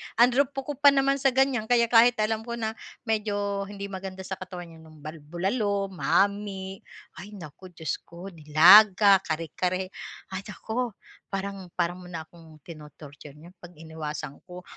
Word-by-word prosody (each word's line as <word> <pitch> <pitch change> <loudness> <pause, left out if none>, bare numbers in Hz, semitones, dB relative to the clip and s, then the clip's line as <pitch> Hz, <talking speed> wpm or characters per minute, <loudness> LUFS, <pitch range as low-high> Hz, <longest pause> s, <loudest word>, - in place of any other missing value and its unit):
Ang 245 +2 +5
rupok 275 0 -1
ko - - -3
pa 285 - +5
naman 275 0 +4
sa 265 -1 +1
ganyan, 265 -5 +1
kaya 235 -1 +2
kahit 240 +1 +6
alam 220 +1 -2
ko 235 - -3
na 220 -2 -3 0.3
medyo 205 -3 -2
hindi 200 -1 -7
maganda 190 0 -7
sa 190 0 -6
katawan 180 -2 -9
yan 160 0 -15
yung 155 -2 -17
bal 155 +1 -8
bulalo, 195 - -2
mami 195 0 -1 0.4
ay 205 +2 -10
naku 180 +1 -11
Diyos 160 -3 -4
ko. 175 +3 -10
Nilaga, 185 +6 +7
kare-kare, 180 +3 -3 0.4
ay 190 +1 -4
naku 225 +1 -4 0.3
parang 195 -1 -5
parang 175 0 -1
mo 180 - -12
na 165 -2 -6
akong 160 -2 -18
tino-torture 150 -2 -12
niyan 165 +4 -15
pag 175 -1 -14
iniwasan 155 -2 -7
ko. 180 0 -10
190 Hz, 165 wpm, -26 LUFS, 165-215 Hz, 0.4 s, Nilaga